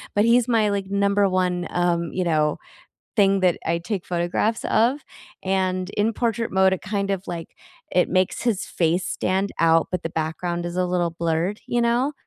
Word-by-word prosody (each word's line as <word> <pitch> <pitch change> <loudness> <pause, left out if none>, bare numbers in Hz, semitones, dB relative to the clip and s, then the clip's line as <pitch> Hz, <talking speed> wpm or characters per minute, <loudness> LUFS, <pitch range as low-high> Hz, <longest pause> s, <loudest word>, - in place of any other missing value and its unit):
but 205 +1 +4
he's 235 0 +4
my, 225 -3 +2
like, 200 -1 -2
number 200 0 +2
1 180 -2 0
um, 170 -1 0
you 185 - 0
know, 155 -3 +1 0.6
thing 195 -2 +4
that 180 -2 +3
I 170 +1 0
take 185 +1 -4
photographs 175 +6 -1
of, 245 +6 +2 0.4
and 185 -1 0
in 215 +2 0
portrait 230 0 -1
mode, 190 0 +4
it 190 - -4
kind 200 0 -2
of, 195 -1 -3
like, 170 -1 -6 0.4
it - - +2
makes 185 0 +1
his 230 -5 0
face 170 +1 0
stand 190 +2 -1
out, 165 -1 +4
but 180 -1 -2
the 165 - -2
background 170 +2 -3
is 175 0 -5
a 185 - +2
little 175 -1 0
blurred, 170 +4 -1
you 240 - +1
know? 240 +5 +1
185 Hz, 185 wpm, -23 LUFS, 175-205 Hz, 0.6 s, but